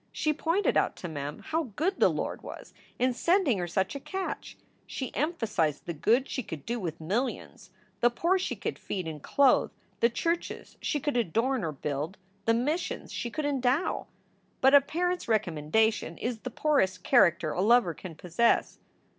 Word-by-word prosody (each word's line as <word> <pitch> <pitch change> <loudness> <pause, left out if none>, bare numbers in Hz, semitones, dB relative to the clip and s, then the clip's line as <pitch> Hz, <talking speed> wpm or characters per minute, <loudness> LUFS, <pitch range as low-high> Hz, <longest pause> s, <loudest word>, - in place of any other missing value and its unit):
She 305 - 0
pointed 335 +6 +1
out - - +2
to 180 - -6
Mem 145 -2 -5
how 315 -4 -1
good 375 +5 0
the - - +6
Lord - - -3
was - - -10 0.2
in 255 0 +2
sending 335 - +2
her 175 - -2
such 190 +2 0
a 280 - -5
catch. 380 +6 -5 0.3
She 260 - -5
emphasized 215 - -1
the 170 - -3
good 235 - +2
she 260 - -3
could 160 - -8
do 240 +1 -2
with 170 -5 -4
millions; 210 +6 -3 0.3
the 240 - +5
poor 340 +10 +1
she - - -2
could - - -4
feed 185 -4 -4
and 155 -2 -6
clothe; 275 - +4 0.3
the 235 - +4
churches 335 +8 -3
she 295 - 0
could 290 -2 -1
adorn 235 +5 +1
or 160 - -1
build; 150 +5 -4 0.3
the 230 - +4
missions 295 +9 -2
she 240 - -3
could 300 +5 -3
endow. 275 +2 0 0.5
But 265 +1 +5
a 285 - +9
parent 355 +5 -1
s - - -8
recom 175 -10 -1
mendation 220 +3 +2
is 240 -1 -2
the 255 - -5
poorest 190 -10 +1
character 170 - +4
a 175 - -1
lover 225 -4 +4
can 165 +1 -9
possess. 180 +8 +1
235 Hz, 180 wpm, -29 LUFS, 180-285 Hz, 0.5 s, a